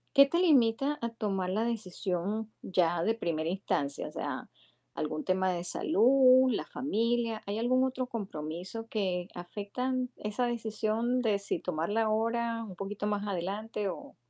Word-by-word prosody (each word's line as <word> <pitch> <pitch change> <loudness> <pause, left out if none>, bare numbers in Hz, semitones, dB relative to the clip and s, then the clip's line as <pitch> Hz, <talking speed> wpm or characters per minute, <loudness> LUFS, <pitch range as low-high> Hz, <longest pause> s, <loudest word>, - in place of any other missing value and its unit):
¿Qué 275 - +10
te 335 +5 0
limita 280 -3 +3
a 235 - 0
tomar 200 -5 -2
la 215 +4 +1
decisión 210 -1 -2
ya 175 -2 +1
de 225 +4 +2
primera 165 -7 -2
instancia? 145 -6 -2
O - - -12
sea, - - -4 0.4
algún 155 0 -3
tema 185 0 +1
de 175 -1 -3
salud, 255 +8 +5
la 225 - -1
familia, 230 -3 0
¿hay 200 +1 -3
algún 255 +3 +3
otro 260 -1 -2
compromiso 190 0 -5
que 185 -4 -1
afectan 250 +8 -3
esa 210 +4 -1
decisión 225 +1 0
de 215 -4 +2
si 200 -4 -3
tomarla 180 +6 0
ahora 230 +1 0
un 190 -4 -9
poquito 205 +2 -4
más 205 0 -1
adelante 200 +3 -2
o? 180 - -6
215 Hz, 150 wpm, -31 LUFS, 185-235 Hz, 0.4 s, Qué